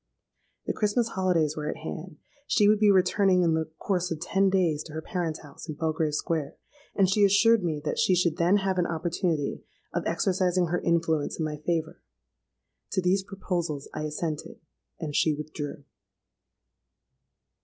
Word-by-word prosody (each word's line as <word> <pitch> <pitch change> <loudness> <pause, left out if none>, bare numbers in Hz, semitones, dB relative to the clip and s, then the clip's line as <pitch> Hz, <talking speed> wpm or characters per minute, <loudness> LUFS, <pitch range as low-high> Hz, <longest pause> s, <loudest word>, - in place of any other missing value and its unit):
The - - -1
Christmas 220 +2 +1
holidays 175 -7 +1
were 150 -1 -3
at - - -4
hand: 160 0 -6 0.3
she 205 -2 +4
would 210 0 +4
be 210 -1 +5
returning 190 -1 +4
in 165 -2 +3
the 160 -1 -1
course 180 -2 -1
of 165 - -3
ten 195 +3 +2
days 175 -6 +1
to 155 - -10
her 160 - -4
parents' 165 -3 -3
house 145 +2 -12
in 155 - -4
Belgrave 155 -1 -1
Square; 160 -2 -2 0.4
and 195 -2 +4
she 205 +2 +3
assured 205 +2 +5
me 160 -4 -1
that - - -1
she 185 - +4
should 170 -2 +1
then 175 +4 +4
have 190 -2 0
an 175 - +2
opportunity 165 -2 -1 0.3
of - - 0
exercising 180 -2 +1
her 175 - 0
influence 165 -3 0
in 160 - -1
my 150 -1 -4
favour. 160 +1 -2 0.9
To 185 - +1
these 185 +2 +3
proposals 175 -6 -3
I 155 - -3
assented; 155 0 -4 0.4
and 150 -3 -4
she 155 -2 +3
withdrew. 150 -1 -6
170 Hz, 165 wpm, -27 LUFS, 155-190 Hz, 0.9 s, be